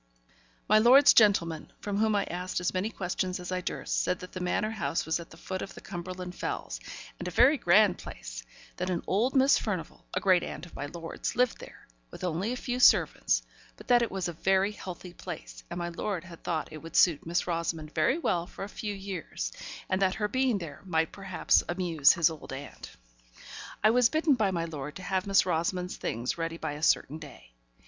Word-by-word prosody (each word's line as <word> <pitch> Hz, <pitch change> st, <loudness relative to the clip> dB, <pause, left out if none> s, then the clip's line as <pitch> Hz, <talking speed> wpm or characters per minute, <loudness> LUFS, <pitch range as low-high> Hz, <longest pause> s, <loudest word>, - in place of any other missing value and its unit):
My 215 Hz, +1 st, +6 dB
lord's 260 Hz, +6 st, +8 dB
gentleman, 170 Hz, -7 st, +3 dB
from 205 Hz, -1 st, -3 dB
whom 220 Hz, -1 st, +2 dB
I 200 Hz, -, +2 dB
asked 180 Hz, +1 st, -3 dB
as 180 Hz, -, -1 dB
many 185 Hz, +3 st, 0 dB
questions 185 Hz, -2 st, -2 dB
as 180 Hz, 0 st, -6 dB
I 185 Hz, 0 st, -1 dB
durst, -, -, -2 dB
said 180 Hz, -, 0 dB
that 180 Hz, -, -9 dB
the 185 Hz, -, -6 dB
Manor 185 Hz, +4 st, 0 dB
House 215 Hz, -6 st, -2 dB
was 160 Hz, +1 st, 0 dB
at 170 Hz, -, -10 dB
the 165 Hz, -, -14 dB
foot 185 Hz, +2 st, -5 dB
of 195 Hz, -, -7 dB
the -, -, -9 dB
Cumberland 180 Hz, 0 st, -6 dB
Fells, -, -, -4 dB, 0.4 s
and 180 Hz, -, -5 dB
a -, -, -1 dB
very 245 Hz, -, +5 dB
grand 200 Hz, -4 st, +4 dB
place; -, -, -8 dB, 0.4 s
that 180 Hz, +1 st, -2 dB
an 175 Hz, -2 st, -1 dB
old 230 Hz, +8 st, +1 dB
Miss 270 Hz, +1 st, +5 dB
Furnivall, 185 Hz, -7 st, -5 dB
a -, -, +2 dB
great 185 Hz, -2 st, +4 dB
aunt -, -, -6 dB
of 175 Hz, -, -15 dB
my 145 Hz, -, -4 dB
lord's, 165 Hz, +2 st, -5 dB
lived 250 Hz, -1 st, +2 dB
there, -, -, -13 dB, 0.2 s
with -, -, -11 dB
only 180 Hz, +5 st, -1 dB
a -, -, -1 dB
few 250 Hz, 0 st, -3 dB
servants; -, -, +4 dB, 0.3 s
but -, -, -14 dB
that 245 Hz, -1 st, +6 dB
it 235 Hz, -, 0 dB
was 190 Hz, -2 st, -2 dB
a 175 Hz, -, -4 dB
very 190 Hz, +4 st, +2 dB
healthy 180 Hz, -3 st, -8 dB
place, -, -, -8 dB
and -, -, -5 dB
my 175 Hz, 0 st, -2 dB
lord 175 Hz, 0 st, -3 dB
had 170 Hz, -2 st, -13 dB
thought 160 Hz, -3 st, -1 dB
that -, -, -15 dB
it -, -, -6 dB
would 165 Hz, 0 st, -10 dB
suit 165 Hz, -3 st, +4 dB
Miss 170 Hz, +2 st, 0 dB
Rosamond 165 Hz, -3 st, -3 dB
very 265 Hz, -, +2 dB
well 175 Hz, -, 0 dB
for -, -, -8 dB
a -, -, -4 dB
few 210 Hz, -1 st, -4 dB
years, 190 Hz, -, -5 dB, 0.4 s
and 185 Hz, +1 st, 0 dB
that 190 Hz, -1 st, +2 dB
her 210 Hz, -, 0 dB
being 260 Hz, 0 st, +1 dB
there 165 Hz, -6 st, -8 dB
might 165 Hz, -4 st, 0 dB
perhaps 195 Hz, -2 st, +2 dB
amuse 175 Hz, -5 st, +4 dB
his 165 Hz, -1 st, +3 dB
old 160 Hz, -, -9 dB
aunt. 135 Hz, +1 st, -8 dB, 0.9 s
I 215 Hz, -, +6 dB
was 245 Hz, 0 st, +4 dB
bidden 315 Hz, -1 st, +3 dB
by 220 Hz, -6 st, +2 dB
my 170 Hz, -3 st, -1 dB
lord 150 Hz, -2 st, -6 dB
to 185 Hz, -, -8 dB
have 190 Hz, +1 st, -1 dB
Miss 195 Hz, -2 st, +4 dB
Rosamond's 180 Hz, +1 st, -1 dB
things 120 Hz, +8 st, -3 dB
ready 165 Hz, 0 st, -2 dB
by 160 Hz, -2 st, -3 dB
a 150 Hz, +1 st, -7 dB
certain 155 Hz, -1 st, +2 dB
day. 135 Hz, -, -13 dB
180 Hz, 215 wpm, -29 LUFS, 165-205 Hz, 0.9 s, lord's